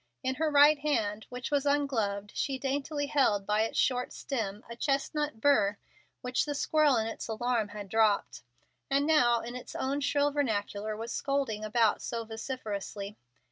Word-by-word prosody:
In 260 Hz, -, 0 dB
her 320 Hz, -, +3 dB
right 290 Hz, +1 st, +6 dB
hand, 220 Hz, -8 st, -1 dB
which 250 Hz, +3 st, -6 dB
was 285 Hz, -2 st, +2 dB
ungloved, 225 Hz, -8 st, 0 dB
she 270 Hz, -1 st, -1 dB
daintily 285 Hz, +2 st, -2 dB
held, 265 Hz, -9 st, +2 dB
by 210 Hz, +1 st, +2 dB
its 225 Hz, -, -1 dB
short 250 Hz, -1 st, +1 dB
stem, 215 Hz, -6 st, -4 dB
a 235 Hz, -, -8 dB
chestnut 285 Hz, 0 st, -1 dB
burr 210 Hz, -6 st, +3 dB, 0.4 s
which 250 Hz, 0 st, 0 dB
the 290 Hz, -1 st, -3 dB
squirrel 300 Hz, -1 st, +3 dB
in 220 Hz, -, +1 dB
its 225 Hz, -, -5 dB
alarm 230 Hz, 0 st, 0 dB
had 205 Hz, 0 st, -8 dB
dropped, 215 Hz, 0 st, +1 dB, 0.5 s
and 280 Hz, +1 st, +2 dB
now, 245 Hz, -7 st, +4 dB
in 240 Hz, +1 st, -7 dB
its 250 Hz, -, -8 dB
own 275 Hz, +2 st, -1 dB
shrill 285 Hz, +1 st, +2 dB
vernacular, 215 Hz, -6 st, -1 dB
was 230 Hz, +1 st, -5 dB
scolding 275 Hz, -7 st, -1 dB
about 215 Hz, 0 st, +2 dB
so 230 Hz, -1 st, -4 dB
vociferously. 215 Hz, -3 st, -5 dB
245 Hz, 165 wpm, -30 LUFS, 215-285 Hz, 0.5 s, right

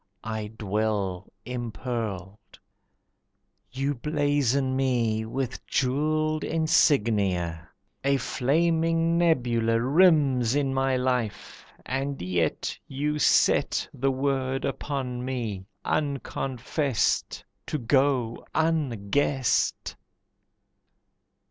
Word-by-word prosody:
I 110 Hz, -1 st, -4 dB
dwell 100 Hz, -3 st, -1 dB, 0.2 s
impearled. 115 Hz, -5 st, -5 dB, 1.1 s
You 135 Hz, +2 st, -1 dB
blazon 140 Hz, -2 st, 0 dB
me 115 Hz, -5 st, 0 dB
with 130 Hz, +1 st, -4 dB
jewelled 155 Hz, +4 st, 0 dB
insignia. 105 Hz, -, +1 dB, 0.3 s
A 140 Hz, 0 st, +3 dB
flaming 165 Hz, +5 st, +1 dB
nebula 120 Hz, -9 st, +2 dB
Rims 135 Hz, -3 st, +4 dB
in 140 Hz, -2 st, +1 dB
my 135 Hz, -1 st, +1 dB
life. 125 Hz, -5 st, -2 dB, 0.2 s
And 135 Hz, +1 st, -2 dB
yet 90 Hz, -3 st, -1 dB
You 150 Hz, +2 st, -2 dB
set -, -, +3 dB
The 135 Hz, +2 st, 0 dB
word 135 Hz, 0 st, -1 dB
upon 135 Hz, -3 st, -3 dB
me, 115 Hz, -7 st, -4 dB, 0.2 s
unconfessed 135 Hz, -2 st, -1 dB, 0.2 s
To -, -, -1 dB
go 130 Hz, -2 st, +1 dB
unguessed. 140 Hz, -4 st, 0 dB
130 Hz, 80 wpm, -26 LUFS, 115-145 Hz, 1.1 s, Rims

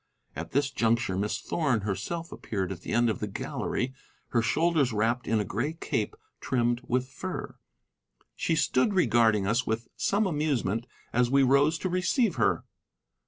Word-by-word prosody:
At 80 Hz, +2 st, -5 dB
this 140 Hz, +1 st, +1 dB
juncture 115 Hz, -5 st, +1 dB
Miss 100 Hz, +2 st, -1 dB
Thorn 135 Hz, -10 st, 0 dB
herself 110 Hz, -, -3 dB
appeared 95 Hz, -3 st, -3 dB
at 90 Hz, -3 st, -6 dB
the -, -, -6 dB
end 120 Hz, 0 st, +3 dB
of 110 Hz, -, -1 dB
the 105 Hz, -, -2 dB
gallery, 125 Hz, +5 st, -3 dB, 0.4 s
her 115 Hz, -, +2 dB
shoulders 150 Hz, +2 st, +2 dB
wrapped 115 Hz, +3 st, 0 dB
in 110 Hz, 0 st, +2 dB
a 105 Hz, -, -1 dB
gray 120 Hz, -, -2 dB
cape 170 Hz, -, -2 dB, 0.2 s
trimmed 120 Hz, -1 st, 0 dB
with 125 Hz, +1 st, 0 dB
fur. 130 Hz, -, -6 dB, 0.8 s
She 165 Hz, -, 0 dB
stood 140 Hz, +5 st, +2 dB
regarding 115 Hz, -, +4 dB
us 115 Hz, +5 st, +1 dB
with 110 Hz, +1 st, -2 dB
some 210 Hz, +2 st, +1 dB
amusement 140 Hz, -, 0 dB, 0.3 s
as 120 Hz, 0 st, +3 dB
we 135 Hz, +1 st, +4 dB
rose 140 Hz, +4 st, +4 dB
to 185 Hz, -, -2 dB
receive 185 Hz, -, +1 dB
her. 110 Hz, -, +2 dB
120 Hz, 165 wpm, -28 LUFS, 110-150 Hz, 0.8 s, regarding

